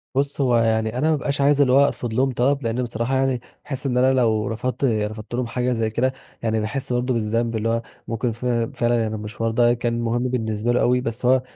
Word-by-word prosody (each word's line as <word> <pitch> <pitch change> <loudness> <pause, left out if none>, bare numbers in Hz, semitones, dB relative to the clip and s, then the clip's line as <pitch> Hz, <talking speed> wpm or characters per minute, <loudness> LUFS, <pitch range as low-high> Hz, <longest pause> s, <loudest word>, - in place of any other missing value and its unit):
بُص، 140 +1 0
هو 125 -3 +3
يعني 110 0 +1
أنا 155 +5 +2
ما 155 - +3
بابقاش 140 0 -2
عايز 145 +1 +4
اللي 130 -3 +4
هو 140 +1 +6
أرفض 120 -2 -4
لهم 130 +3 +2
طلب، 135 +3 +1
لأن 115 +2 -1
بصراحة 120 +2 -2
يعني 130 -2 +1 0.2
أحس 135 0 -5
إن 125 -2 0
أنا 130 +1 +4
لو 110 -4 +2
رفضت 125 +5 -3
رفضت 110 -1 -2
لهم 125 0 -1
حاجة 125 +1 -1
زي 115 -2 0
كده، 125 +4 0 0.3
يعني 110 -1 +1
باحس 125 +4 -3
برضه 125 +1 0
بالذنب، 115 +1 0
اللي 110 +1 0
هو 115 0 +1 0.3
ممكن 115 +1 -1
ف 115 +3 -8 0.3
فعلًا 120 0 +2
يعني 110 -1 -2
المشوار 110 +2 -3
ده 120 +1 +4
كان 120 -1 -1
مهم 120 +1 0
بالنسبة 115 -2 -1
له 125 - +2
أوي، 125 +1 +3
بس 115 0 -4
هو 130 +1 +4
120 Hz, 230 wpm, -22 LUFS, 115-130 Hz, 0.3 s, هو